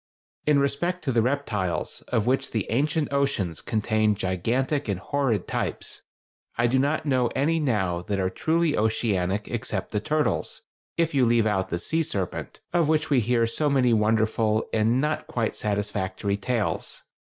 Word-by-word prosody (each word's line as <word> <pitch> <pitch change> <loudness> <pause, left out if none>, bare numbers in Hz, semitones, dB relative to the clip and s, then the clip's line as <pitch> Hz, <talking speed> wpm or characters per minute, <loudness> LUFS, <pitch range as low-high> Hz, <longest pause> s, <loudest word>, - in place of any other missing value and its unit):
In 150 -1 +5
respect 170 +6 0
to 140 - 0
the 115 -2 +3
reptiles, 110 -8 -1
of 110 - 0
which 130 +2 +1
the 110 -4 -1
ancient 150 +4 0
oceans 135 - 0
contained 110 -1 +1
gigantic 120 - -1
and 100 -3 -1
horrid 115 0 -1
types, - - -3 0.6
I 120 - +3
do 130 +2 +3
not 145 +3 0
know 130 -4 +2
any 165 +4 +2
now 95 - 0
that 100 +3 -2
are 95 -1 0
truly 160 - +1
oceanic 105 -3 0
except 105 -4 -3
the 105 - 0
turtles, 150 +8 -1 0.3
if 165 -1 +1
you 135 -2 +3
leave 115 -1 +3
out 95 -3 0
the 85 - -1
"sea 160 - 0
serpent," 100 - -4
of 170 -3 +3
which 155 0 +1
we 135 - +5
hear 115 +1 +2
so 145 +6 0
many 130 -4 +3
wonderful 110 0 +2
and 115 +3 +2
not 150 +2 -1
quite 115 -3 -1
satisfactory 100 -1 -1
tales. 115 +2 -2
115 Hz, 165 wpm, -25 LUFS, 105-140 Hz, 0.6 s, In